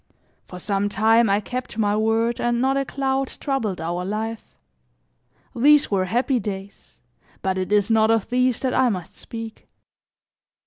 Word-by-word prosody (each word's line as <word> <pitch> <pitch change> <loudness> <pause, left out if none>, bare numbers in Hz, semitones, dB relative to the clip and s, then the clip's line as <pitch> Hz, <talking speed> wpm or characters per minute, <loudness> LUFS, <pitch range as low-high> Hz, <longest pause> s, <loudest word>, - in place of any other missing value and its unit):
For 180 - -9
some 200 +2 -1
time, 225 +2 +3
I 200 +1 +3
kept 245 +1 -6
my 205 -2 +1
word 225 +2 +1
and 240 0 +1
not 265 +2 +2
a 275 0 0
cloud 270 0 -1
troubled 230 -10 -2
our 175 +2 -3
life. 220 +3 -5 1.0
These 290 +3 +4
were 190 -2 +1
happy 245 +6 +1
days, 195 -1 -8 0.4
but 190 0 0
it 185 +2 -3
is 210 +1 +2
not 220 0 +4
of 225 -3 +2
these 250 0 +1
that 260 -1 0
I 255 - +3
must 185 -6 -5
speak. 225 -1 -9
225 Hz, 160 wpm, -23 LUFS, 200-250 Hz, 1.0 s, These